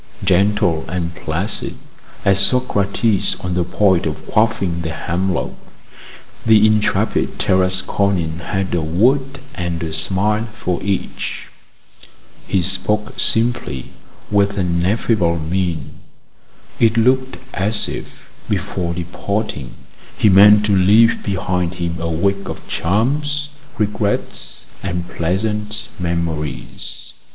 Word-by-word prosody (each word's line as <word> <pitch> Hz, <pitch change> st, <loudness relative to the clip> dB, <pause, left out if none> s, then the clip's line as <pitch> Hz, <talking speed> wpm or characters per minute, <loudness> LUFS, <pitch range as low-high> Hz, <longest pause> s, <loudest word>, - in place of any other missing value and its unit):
Gentle 95 Hz, -3 st, +2 dB
and 85 Hz, 0 st, -3 dB
placid 85 Hz, +4 st, -3 dB, 0.5 s
as 100 Hz, 0 st, +4 dB
Socrates 105 Hz, -2 st, +2 dB
on 90 Hz, 0 st, -3 dB
the 90 Hz, 0 st, +1 dB
point 95 Hz, 0 st, +2 dB
of -, -, -5 dB
quaffing 105 Hz, -6 st, +1 dB
the 80 Hz, -, -3 dB
hemlock, 90 Hz, +3 st, -2 dB, 0.9 s
the 110 Hz, -1 st, +6 dB
intrepid 110 Hz, -1 st, +1 dB
Tarasconian 95 Hz, -2 st, +1 dB
had 95 Hz, +3 st, -3 dB
a 85 Hz, -, +1 dB
word 130 Hz, -, +1 dB
and 85 Hz, -4 st, -3 dB
a 80 Hz, -1 st, -4 dB
smile 100 Hz, +7 st, +1 dB
for 90 Hz, -3 st, -1 dB
each. 100 Hz, -1 st, -3 dB, 1.0 s
He 95 Hz, -3 st, +1 dB
spoke 95 Hz, +3 st, -1 dB
simply, 115 Hz, -, +1 dB, 0.4 s
with 100 Hz, 0 st, +2 dB
an 85 Hz, -2 st, 0 dB
affable 95 Hz, -3 st, +1 dB
mien; 85 Hz, +1 st, -2 dB, 0.8 s
it 115 Hz, 0 st, +3 dB
looked 130 Hz, +3 st, +2 dB, 0.2 s
as 105 Hz, +2 st, +1 dB
if, -, -, -8 dB, 0.2 s
before 95 Hz, -3 st, -2 dB
departing, 90 Hz, -, -4 dB, 0.4 s
he 105 Hz, -, +4 dB
meant 105 Hz, +2 st, +7 dB
to 100 Hz, -2 st, +2 dB
leave 105 Hz, +5 st, +5 dB
behind 90 Hz, -3 st, -1 dB
him 85 Hz, -1 st, -3 dB
a 85 Hz, -, -1 dB
wake 100 Hz, +5 st, 0 dB
of -, -, -8 dB
charms, 145 Hz, -, 0 dB, 0.3 s
regrets, 105 Hz, -1 st, -2 dB, 0.2 s
and 90 Hz, -2 st, -3 dB
pleasant 105 Hz, +5 st, -2 dB
memories. 80 Hz, -7 st, -4 dB
95 Hz, 110 wpm, -19 LUFS, 85-105 Hz, 1.0 s, meant